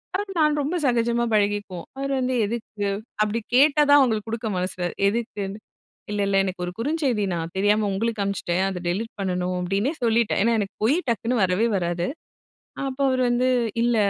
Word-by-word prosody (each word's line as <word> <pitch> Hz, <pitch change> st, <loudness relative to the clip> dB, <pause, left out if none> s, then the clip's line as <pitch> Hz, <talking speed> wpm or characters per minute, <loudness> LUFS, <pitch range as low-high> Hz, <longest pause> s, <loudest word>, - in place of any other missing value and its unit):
அவர் 400 Hz, +1 st, -3 dB
நான் 300 Hz, -1 st, +3 dB
ரொம்ப 295 Hz, +5 st, -2 dB
சகஜமா 235 Hz, -1 st, +2 dB
பழகிக்குவோம். 205 Hz, -4 st, 0 dB
அவர் 275 Hz, 0 st, -2 dB
வந்து 255 Hz, 0 st, 0 dB
"எதுக்கு?" 215 Hz, -2 st, -4 dB, 0.3 s
அப்பிடி 215 Hz, +2 st, +1 dB, 0.2 s
கேட்டா 290 Hz, +3 st, +5 dB
தான் 290 Hz, -, +8 dB
அவுங்களுக்கு 225 Hz, -5 st, +1 dB
கொடுக்க 225 Hz, 0 st, -3 dB
மனசுல 180 Hz, 0 st, -3 dB, 0.2 s
எதுக்குன்னு 205 Hz, -2 st, -3 dB, 0.5 s
"இல்ல, 205 Hz, 0 st, -1 dB
இல்ல 195 Hz, 0 st, +1 dB
எனக்கு 185 Hz, -1 st, -4 dB
ஒரு 175 Hz, -, -4 dB
குறுஞ்செய்தி 265 Hz, -4 st, 0 dB
நான் 165 Hz, 0 st, -4 dB
தெரியாம 205 Hz, +2 st, +3 dB
உங்களுக்கு 220 Hz, +2 st, -1 dB
அனுப்பிச்சுட்டேன். 190 Hz, -2 st, -1 dB
அத 180 Hz, -2 st, -5 dB
டெலிட் 215 Hz, +6 st, -2 dB
பண்ணணும்." 180 Hz, -1 st, -1 dB
அப்பிடின்னே 195 Hz, -, 0 dB
சொல்லிட்டேன். 230 Hz, -1 st, +2 dB
ஏன்னா, 230 Hz, 0 st, +3 dB
எனக்கு 200 Hz, 0 st, -4 dB
பொய் 260 Hz, +8 st, +4 dB
டக்குன்னு 230 Hz, +1 st, 0 dB
வரவே 185 Hz, +5 st, +2 dB
வராது. 175 Hz, -1 st, -1 dB, 0.8 s
அப்போ 265 Hz, +1 st, -7 dB
அவரு 255 Hz, -1 st, +1 dB
வந்து 245 Hz, +1 st, +2 dB, 0.4 s
இல்ல 240 Hz, 0 st, +2 dB
215 Hz, 165 wpm, -24 LUFS, 195-240 Hz, 0.8 s, தான்